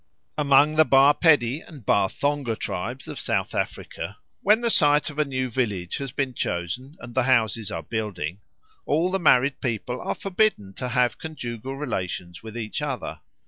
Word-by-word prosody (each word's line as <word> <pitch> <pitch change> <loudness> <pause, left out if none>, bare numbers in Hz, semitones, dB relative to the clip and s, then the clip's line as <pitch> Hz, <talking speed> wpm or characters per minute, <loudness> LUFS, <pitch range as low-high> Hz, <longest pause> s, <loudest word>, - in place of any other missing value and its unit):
Among 145 +1 +4
the 155 - +8
Ba 140 0 +6
Pedi 145 -4 +3
and 145 - -13
Ba 100 -1 +3
Thonga 145 -5 -1
tribes 120 +8 -4
of - - -6
South - - -1
Africa, - - -4 0.2
when 210 +4 +4
the 235 -1 +2
site 150 -2 +4
of 150 - -8
a 150 - +3
new 130 -2 -2
village 105 -8 -2
has 135 -2 -5
been 135 -1 -2
chosen 120 - -3
and 120 0 -9
the 130 0 +2
houses 115 -5 +2
are 85 -1 -4
building, 95 -4 -4 0.5
all 165 +5 +2
the 195 - 0
married 140 -5 +4
people 120 +1 -2
are - - -2
forbidden 195 - 0
to 125 +5 -4
have 125 0 +1
conjugal 130 -5 -6
relations 90 -10 -4
with 110 +1 -8
each 110 +5 -4
other. 140 -4 -4
130 Hz, 175 wpm, -25 LUFS, 110-145 Hz, 0.5 s, the